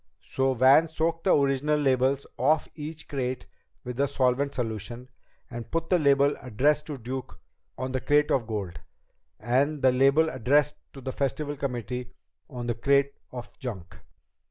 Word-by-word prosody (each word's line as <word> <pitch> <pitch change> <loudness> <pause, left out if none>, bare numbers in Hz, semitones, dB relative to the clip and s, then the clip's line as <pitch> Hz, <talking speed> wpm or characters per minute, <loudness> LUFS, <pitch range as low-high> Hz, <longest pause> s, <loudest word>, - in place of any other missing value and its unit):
So 135 0 0
Van 135 +6 +6
soaked 160 +1 -2
the 190 - +5
original 140 +2 +1
labels 135 0 +2
off 155 0 +2
each 155 +1 -8
crate 130 -2 -3 0.4
with 125 +1 -6
a 140 - +3
solvent 140 +1 +1
solution, 120 +1 -4 0.4
and 120 -1 -8
put 165 +1 -2
the 180 - +5
label 140 -1 +4
addressed 140 +5 +1
to 150 -3 -5
Duke 130 +2 -6 0.4
on 130 0 -3
the 130 -1 -2
crate 150 0 +3
of 120 -5 +1
gold, 100 -6 -4 0.6
and 135 +6 +1
the 130 - +6
label 135 +5 +4
addressed 140 +4 +2 0.2
to 135 - -10
the 130 +1 -4
Festival 145 +2 -2
committee 125 -2 -4 0.4
on 125 -4 -6
the 120 - 0
crate 140 +4 +2 0.2
of 120 -1 -8
junk. 105 -10 -7
135 Hz, 155 wpm, -27 LUFS, 125-145 Hz, 0.6 s, Van